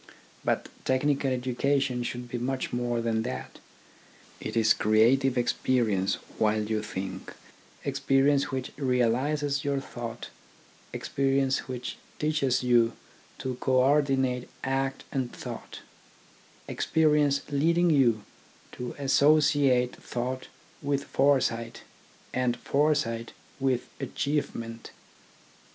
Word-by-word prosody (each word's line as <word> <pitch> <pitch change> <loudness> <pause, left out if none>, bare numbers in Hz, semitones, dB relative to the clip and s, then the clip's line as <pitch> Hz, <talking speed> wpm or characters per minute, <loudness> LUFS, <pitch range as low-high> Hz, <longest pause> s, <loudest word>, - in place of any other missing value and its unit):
But - - 0 0.2
technical 135 +1 +1
educa 130 +2 +1
tion 130 -2 -1
should 120 0 -4
be 120 0 -4
much 130 +1 -2
more 120 -1 0
than 115 -1 0
that: 125 +3 -6 0.8
it - - -4
is 110 -1 +5
crea 110 +4 +4
tive 135 -1 0
experience 115 -5 +1 0.2
while 110 0 +2
you 110 0 -1
think, 95 -2 -6 0.5
experience 140 +1 +2
which 130 -1 -3
realises 140 +3 +1
your 140 -1 0
thought, 120 -3 -7 0.6
experience 135 0 0
which 125 -1 -5 0.2
teaches 140 -5 +1
you 120 -2 +4 0.4
to 130 -2 -4
co 130 - +1
ordinate 130 -1 +2
act 135 0 -1
and 130 -3 -2
thought, - - -8 0.9
experience 150 -3 +2
leading 165 +4 +3
you 120 -7 +3 0.5
to 125 -1 -6
associate 140 -2 +3
thought 130 +2 -4 0.3
with 140 -1 0
foresight 130 -5 +1 0.5
and 125 -1 +1
foresight 140 -6 0 0.3
with 130 -2 0
achievement. 115 -6 -3
130 Hz, 105 wpm, -28 LUFS, 120-140 Hz, 0.9 s, is